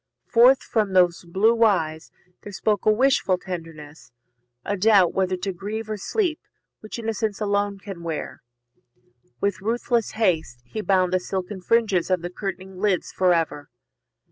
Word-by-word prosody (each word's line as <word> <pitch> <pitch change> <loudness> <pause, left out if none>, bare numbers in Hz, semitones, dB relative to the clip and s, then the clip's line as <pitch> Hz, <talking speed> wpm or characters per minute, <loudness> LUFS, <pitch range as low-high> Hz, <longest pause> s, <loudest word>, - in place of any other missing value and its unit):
Forth 245 +3 +5
from 210 -4 -1
those 180 -2 +3
blue 220 +7 +2
eyes 160 -7 +1 0.3
There 205 - -9
spoke 210 +1 -1
a - - +7
wishful 225 -5 +2
tenderness, 165 -6 -9 0.5
a 205 - -1
doubt 200 -2 +4
Whether 185 -1 0
to 195 +1 -3
grieve 215 +4 -5
or 215 - -2
sleep, 340 - -1 0.4
which 215 - -8
Innocence 220 -2 -2
Alone 205 -1 0
can 195 -3 -9
wear. 165 -2 -5 1.0
With 200 -2 -1
ruthless 235 +1 -1
haste 160 - 0
he 215 - -5
bound 185 -3 +2
The 185 - +3
silken 190 +1 -5
fringes 205 -4 +1
of 185 -2 +1
the 175 - -4
curtaining 190 -1 -6
lids 195 -3 0
For 185 -1 +2
ever. 160 -4 -1
195 Hz, 150 wpm, -23 LUFS, 180-215 Hz, 1.0 s, a